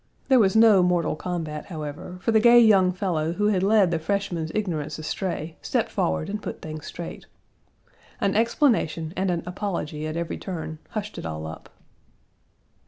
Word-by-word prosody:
There 260 -2 +6
was 195 -2 +3
no 220 -4 +7
mortal 180 -3 +1
combat, 160 -3 -4
however, 155 +1 -6
for 230 - +2
the 220 - +5
gay 240 +2 +7
young 195 -5 +5
fellow 170 -4 -1
who 210 +3 +1
had 190 -3 +1
led 200 -2 +4
the 165 - 0
freshman's 175 -2 -2
ignorance 160 -8 -2
astray 160 0 -4
stepped - - -1
forward 80 -1 0
and 210 +1 -4
put - - -6
things 155 -1 -7
straight. 170 - -8 0.9
An 195 - +1
explanation 220 - +1
and 190 0 0
an 170 -2 -1
apology 170 -5 -4
at 155 +1 -4
every 170 0 -3
turn 160 -4 -6
hushed 210 -1 -5
it - - -7
all 80 -1 -5
up. 80 0 -9
180 Hz, 170 wpm, -25 LUFS, 155-205 Hz, 0.9 s, no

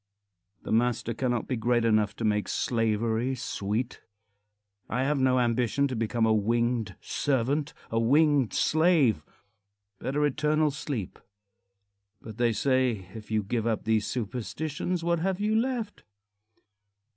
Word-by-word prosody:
The - - -6
master 120 0 +1
cannot 120 0 -1
be 130 - -1
great 120 0 +1
enough 110 -2 +2
to 115 - -3
make 105 -1 +1
slavery 115 +2 0
sweet. 115 +1 -3 0.9
I 125 +3 0
have 145 +1 +1
no 130 -1 +3
ambition 125 +3 +1
to 130 - -3
become 115 0 0
a 110 - +3
winged 115 -1 0
servant, 140 +2 -1 0.2
a 115 - +1
winged 140 +1 +3
slave. 155 - +3 0.8
Better 145 +3 0
eternal 150 +1 +1
sleep. 135 - -5 1.0
But 110 +1 -10
they 120 -1 +2
say, 120 -5 0
"If 110 -2 -10
you 110 -1 0
give 115 +3 -2
up 110 -2 -1
these 110 -1 +1
superstitions, 145 - -3
what 170 0 +1
have 190 +2 -1
you 210 +1 +1
left?" 230 -2 -1
120 Hz, 135 wpm, -28 LUFS, 110-145 Hz, 1.0 s, no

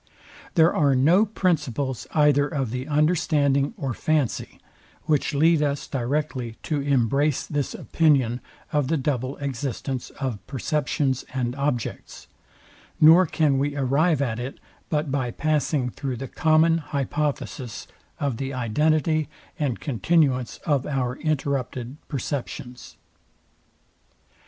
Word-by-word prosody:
There 165 -1 +5
are 140 -3 +3
no 170 +11 +4
principles 145 - -1
either 145 -2 +4
of 135 -7 -2
the 125 +3 -4
understanding 150 - +2
or 135 -8 -2
fancy, 150 -1 -1 0.4
which 150 -2 0
lead 160 +2 +4
us 145 -1 -1
directly 130 -2 -2
to 150 -3 -1
embrace 140 +1 +1
this 145 -2 -2
opinion 135 -7 +2 0.3
of 145 -3 +2
the 160 +3 +1
double 130 -1 -2
existence 135 -1 -4
of 130 -7 -2
perceptions 135 -1 -1
and 125 -1 -1
objects, 140 -5 -3 0.7
nor 165 +4 +7
can 150 -3 +2
we 145 +1 -1
arrive 140 +3 +2
at 115 -3 -2
it 130 +3 -6 0.3
but 150 -2 -1
by 130 -3 0
passing 145 -1 0
through 135 0 -4
the 135 +3 -5
common 160 +2 +3
hypothesis 140 -4 -3 0.3
of 140 -5 -1
the 135 +1 -4
identity 155 +6 +1 0.3
and 140 -6 -1
continuance 135 - +1
of 145 -5 +1
our 125 -3 -1
interrupted 135 -4 -2
perceptions. 130 -3 -5
140 Hz, 120 wpm, -24 LUFS, 130-155 Hz, 0.7 s, nor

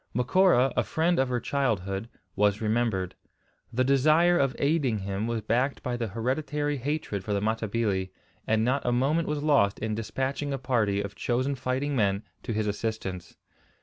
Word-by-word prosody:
Macora, 135 +1 +4
a - - +3
friend 170 +1 +1
of 130 -1 +2
her 125 -1 0
childhood, 110 -7 -1 0.3
was 105 0 +2
remembered. 110 -4 0 0.6
The 125 +2 +1
desire 155 +6 +4
of 135 -5 +1
aiding 140 -6 +1
him 100 +2 -3
was 115 -1 -1
backed 125 +6 0
by 125 - -2
the 120 -1 -2
hereditary 145 +7 -1
hatred 135 -7 -3
for 105 +1 -1
the - - +1
Matabili, 110 -2 -1 0.4
and 110 0 +2
not 135 +3 +1
a 120 - +1
moment 140 +7 +1
was 150 -1 -2
lost 120 -10 +3
in 110 0 -2
despatching 135 +6 -2
a - - -1
party 110 -6 0
of 100 0 -6
chosen 130 +5 -1
fighting 130 +2 -2
men 100 -3 +1 0.2
to - - -5
his 110 -1 0
assistance. 105 -4 -4
120 Hz, 170 wpm, -27 LUFS, 105-140 Hz, 0.6 s, Macora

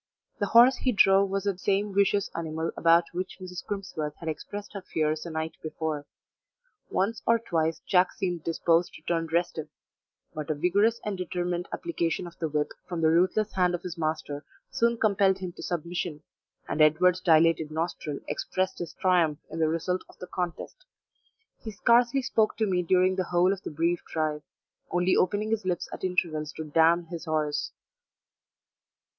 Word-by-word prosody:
The 205 - 0
horse 240 +5 +7
he 255 - +1
drove 195 -2 +5
was 195 0 -1
the 200 -2 0
same 200 +1 0
vicious 200 0 +2
animal 160 0 -3
about 170 +1 +5
which 185 +2 -4
Mrs. 180 -1 -7
Crimsworth 160 -7 -4
had 165 - -10
expressed 205 +7 -6
her 200 - -5
fears 155 -3 -1
the 170 - -6
night 160 0 -4
before. 155 -2 -4 0.8
Once 210 +4 0
or 230 - +5
twice 165 -7 -1
Jack 180 -1 +4
seemed 175 -4 -3
disposed 165 +1 +1
to 155 - -13
turn 165 -1 -1
restive, 165 -2 -1 0.6
but 155 -1 -5
a 155 - +1
vigorous 200 +9 +2
and 200 -3 -3
determined 180 0 -2
application 180 - -2
of 170 -1 -10
the 160 - -1
whip 150 0 -1 0.2
from 175 -2 -3
the 160 0 +4
ruthless 185 +5 +2
hand 180 -1 +2
of 175 - -7
his 180 -2 -5
master 155 -3 -3 0.3
soon 235 0 +2
compelled 200 -3 +3
him 185 -2 -5
to - - -12
submission, 170 -2 -3 0.4
and 155 - -1
Edward's 175 +4 +4
dilated 165 -2 +4
nostril 155 -2 -3
expressed 185 0 -2
his 175 - -6
triumph 175 -5 +2
in 165 - -5
the 160 -1 +3
result 175 +3 -1
of - - -18
the - - -7
contest; 180 - -5 0.8
he 225 - -7
scarcely 235 +5 +3
spoke 220 -4 +1
to 220 - +2
me 185 -3 +1
during 185 +2 +2
the 185 - 0
whole 175 +2 +3
of 195 - -7
the - - -6
brief 165 +3 0
drive, 155 -2 -1 0.5
only 180 +1 +2
opening 205 +4 +1
his 225 -1 0
lips 180 -2 -2
at - - -8
intervals 160 -5 -1
to 160 - -6
damn 165 +3 +3
his 170 0 -7
horse. 155 -2 -1
175 Hz, 175 wpm, -27 LUFS, 160-195 Hz, 0.8 s, horse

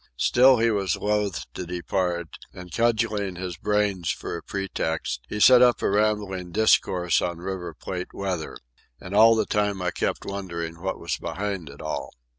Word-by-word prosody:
Still 130 - +5
he 115 0 +3
was 100 -5 0
loth 105 -2 -1
to - - -5
depart, 90 -1 -2 0.3
and, 90 -1 -10
cudgelling 110 -4 +1
his 90 -1 -5
brains 100 -2 0
for - - -3
a 85 - -6
pretext, 90 - -3
he 105 - -4
set 125 +3 +8
up 125 -1 +5
a - - +2
rambling 100 -4 0
discourse 90 -4 +3
on 85 -1 -2
River 90 0 -5
Plate 90 -1 -6
weather. 95 -5 -4 0.4
And 95 - -9
all 115 +2 +7
the 110 - +1
time 105 -2 0
I 90 0 -1
kept - - -2
wondering 85 -4 -5
what 95 +1 -2
was - - -2
behind 100 -6 -4
it 70 +2 -11
all. 75 - -4
95 Hz, 170 wpm, -25 LUFS, 90-105 Hz, 0.4 s, set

